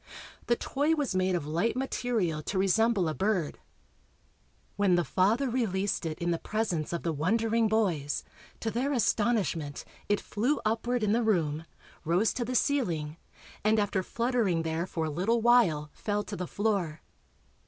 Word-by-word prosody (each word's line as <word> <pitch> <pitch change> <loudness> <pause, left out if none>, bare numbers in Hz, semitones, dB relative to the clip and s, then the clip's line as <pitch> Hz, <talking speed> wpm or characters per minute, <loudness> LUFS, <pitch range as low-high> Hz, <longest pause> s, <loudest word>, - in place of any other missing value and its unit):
The 240 - +4
toy 290 +6 0
was 290 -8 -1
made 185 0 +1
of 165 -4 -2
light 170 +11 0
material 230 -11 -1
to 190 - -3
resemble 195 0 +3
a 155 - -1
bird. 190 -4 -1 1.2
When 200 -3 +3
the 175 - +2
father 215 - +2
released 205 -7 -1
it 155 -1 -4
in 175 0 -1
the 165 - -1
presence 215 -8 -2
of 170 - -3
the 165 - 0
wondering 225 +8 +1
boys, 180 -10 0 0.4
to 225 - -1
their 260 +6 0
astonishment 205 - 0 0.2
it 205 - +3
flew 245 +8 -1
upward 230 +2 0
in 210 - +2
the 235 +3 +3
room, 165 -8 0 0.4
rose 180 +6 +2
to 245 - -2
the 250 +2 -3
ceiling 170 - 0 0.5
and 215 +1 +3
after 205 -2 +1
fluttering 230 -6 0
there 165 +2 -2
for 165 -3 -2
a 155 - -2
little 195 +10 +1
while 220 -11 +3
fell 205 0 -2
to 205 - -6
the 180 -2 -4
floor. 195 -7 -1
205 Hz, 165 wpm, -29 LUFS, 170-230 Hz, 1.2 s, The